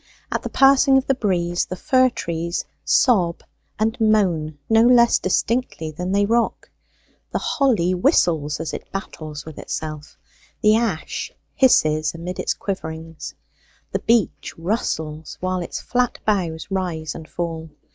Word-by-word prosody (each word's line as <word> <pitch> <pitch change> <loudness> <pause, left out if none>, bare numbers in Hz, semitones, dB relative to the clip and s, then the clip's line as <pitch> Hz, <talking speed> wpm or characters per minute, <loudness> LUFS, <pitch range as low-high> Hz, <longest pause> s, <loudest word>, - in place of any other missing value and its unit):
At - - -1
the - - -5
passing 270 0 +5
of 265 - +1
the 270 - +2
breeze 175 -7 0
the 185 - -4
fir 255 +6 +3
trees 170 -5 -3 0.2
sob 185 -10 +3 0.3
and 225 +2 -1
moan 180 -9 +2
no 225 0 +5
less 235 0 +5
distinctly 190 -4 -1
than 180 +4 -4
they 200 +1 +3
rock; 230 +2 0 0.6
the - - -2
holly 220 - +1
whistles 160 -4 +2
as 160 - -4
it - - -7
battles 155 -6 -6
with 160 -2 -9
itself; 155 -1 -6 0.5
the 215 0 +6
ash 220 -8 -2 0.2
hisses 155 - +3
amid 175 +2 -6
its - - 0
quiverings; 165 -4 -6 0.6
the - - -1
beech 230 -4 0
rustles 160 -5 -3
while 185 0 -1
its 170 - -5
flat 250 -1 0
boughs 180 -4 -1
rise 175 -5 -2
and 160 - -10
fall. 165 -2 -4
180 Hz, 140 wpm, -22 LUFS, 160-225 Hz, 0.6 s, the